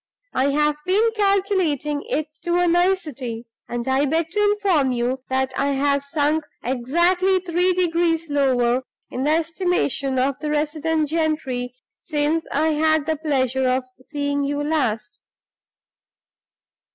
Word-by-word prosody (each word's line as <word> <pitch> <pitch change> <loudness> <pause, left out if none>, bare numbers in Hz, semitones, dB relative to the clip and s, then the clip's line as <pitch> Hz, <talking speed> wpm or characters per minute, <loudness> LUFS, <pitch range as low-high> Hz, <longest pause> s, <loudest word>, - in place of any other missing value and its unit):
I've 295 +3 +1
been 425 +5 +3
calculating 375 - +1
it 310 - 0 0.2
to 345 +1 -1
a 355 0 +3
nicety, 310 -10 0 0.2
and 240 0 -4
I 265 +2 +2
beg 320 +3 0
to 415 +3 0
inform 395 -10 +2
you 250 +2 -1
that 265 0 0
I 280 +1 +1
have 280 0 +1
sunk 295 +2 0 0.2
exactly 345 +10 +2
three 360 0 +1
degrees 335 -2 +1
lower 260 -4 +2 0.3
in 260 +2 -2
the - - +2
estimation 320 -4 0
of 265 +1 0
the 305 - -3
resident 305 +1 0
gentry 300 -6 -1 0.2
since 310 0 -1
I 310 +3 +2
had 315 -1 +2
the 315 0 -1
pleasure 265 -4 0
of 255 +1 +1 0.2
seeing 285 0 -2
you 285 +1 -1
last." 230 -9 -1
300 Hz, 130 wpm, -22 LUFS, 265-335 Hz, 0.3 s, been